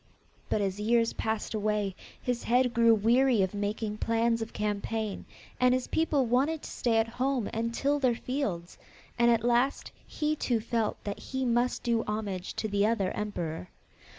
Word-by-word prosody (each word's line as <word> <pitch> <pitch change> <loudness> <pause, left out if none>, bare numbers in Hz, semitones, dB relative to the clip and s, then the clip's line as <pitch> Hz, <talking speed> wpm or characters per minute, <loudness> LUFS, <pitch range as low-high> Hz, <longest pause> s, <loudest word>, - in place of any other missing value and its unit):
But 210 - +1
as 195 0 -1
years 230 +2 +2
passed 220 0 -2
away, 210 -2 -1 0.2
his 245 -1 -2
head 250 +1 +3
grew 230 0 +5
weary 235 +1 +3
of 190 - -2
making 210 +1 -3
plans 230 0 +1
of 225 - -4
campaign, 210 0 -3 0.3
and 250 0 +4
his 255 - -1
people 300 -4 +1
wanted 275 +7 +1
to - - -7
stay 230 -2 +1
at 225 0 +2
home 250 0 -1
and 230 +1 -1
till 285 +4 0
their 255 -4 +2
fields, 220 -10 -3 0.4
and 235 0 +5
at 230 -1 +3
last 245 +3 +1 0.2
he 305 0 -1
too 245 -6 0
felt 225 -1 -1
that 205 -1 -4
he 265 -1 -3
must 240 +1 +1
do 230 -1 +1
homage 205 -4 -3
to 220 - -2
the 205 -1 +1
other 210 -4 +1
emperor. 170 - -4
230 Hz, 175 wpm, -29 LUFS, 210-250 Hz, 0.4 s, grew